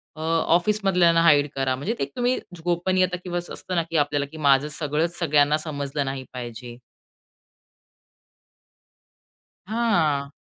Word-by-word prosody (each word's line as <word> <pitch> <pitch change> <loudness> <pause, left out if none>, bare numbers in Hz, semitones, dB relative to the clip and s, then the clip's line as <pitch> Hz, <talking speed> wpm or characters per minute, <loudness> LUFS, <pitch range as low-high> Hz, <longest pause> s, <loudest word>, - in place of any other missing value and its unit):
अ, 155 - -9
ऑफिसमधल्यांना 170 +1 +2
hide 150 -3 +5
करा. 135 -1 0
म्हणजे 145 - -3
ते - - 0
तुम्ही 245 +1 +1 0.3
गोपनीयता 180 +1 +1
किंवा 175 -1 -3
असं 175 - -8
असतं 185 - -5
ना 170 - +2
की 165 - 0
आपल्याला 145 -1 +1
की 160 - -10
माझं 140 -1 +3
सगळंच 160 +3 -1
सगळ्यांना 150 -3 +3
समजलं 145 -2 -3
नाही 135 0 -4
पाहिजे. 120 -1 -8 2.9
हां. 170 -11 0
155 Hz, 125 wpm, -24 LUFS, 140-175 Hz, 2.9 s, hide